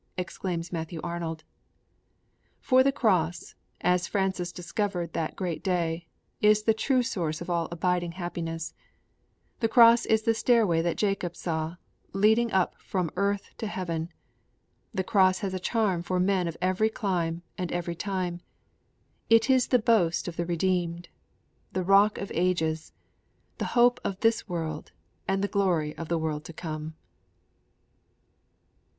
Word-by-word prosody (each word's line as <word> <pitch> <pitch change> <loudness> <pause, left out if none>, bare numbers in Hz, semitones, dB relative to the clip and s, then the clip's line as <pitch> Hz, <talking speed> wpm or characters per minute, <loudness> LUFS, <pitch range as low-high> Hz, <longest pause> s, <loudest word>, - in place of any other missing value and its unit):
_' - - -47
exclaims 175 -1 -4
Matthew 165 0 -4
Arnold. 165 -2 -4 1.2
For 260 0 +4
the 275 +1 +4
Cross, 180 -9 0 0.3
as 180 0 +2
Francis 190 -3 -1
discovered 180 -1 -3
that 160 -2 -2
great 175 -5 -3
day, 170 -2 -1 0.3
is 210 0 +5
the 220 - +4
true 255 +3 +1
source 165 -8 -2
of 175 +1 -5
all 170 -2 0
abiding 175 0 -1
happiness; 165 -2 -4 0.9
the 225 - +2
Cross 230 0 +6
is 220 0 +3
the 225 0 +3
stairway 225 -8 +3
that 170 0 -1
Jacob 195 -4 -1
saw, 160 0 -3 0.4
leading 220 +4 +3
up 190 -1 0
from 180 -4 -2
earth 200 +1 -1
to 220 - -2
heaven; 170 -4 -3 0.8
the 190 -4 -1
Cross 185 -3 +3
has 195 -2 -2
a 185 - -2
charm 195 -3 0
for 180 +1 -1
men 185 -1 +2
of 165 - -5
every 185 +4 +2
clime 175 -6 -2
and 180 -2 -4
every 175 -1 -2
time; 180 -1 -3 0.9
it 225 +3 +5
is 255 -1 +4
the 250 - +4
boast 215 -9 +2
of 175 - -5
the 170 0 -2
redeemed; 175 -1 -1 0.6
the 185 - -1
rock 200 +3 +5
of 200 - -5
ages; 160 -3 0 0.7
the - - -1
hope 245 +1 +5
of 195 -1 -3
this 225 -2 +2
world 160 -3 -4 0.4
and 195 0 0
the - - +2
glory 175 -7 0
of 165 - -6
the 170 - 0
world 155 -2 -2
to 165 - -9
come. 155 -1 -6
180 Hz, 150 wpm, -27 LUFS, 170-205 Hz, 1.2 s, Cross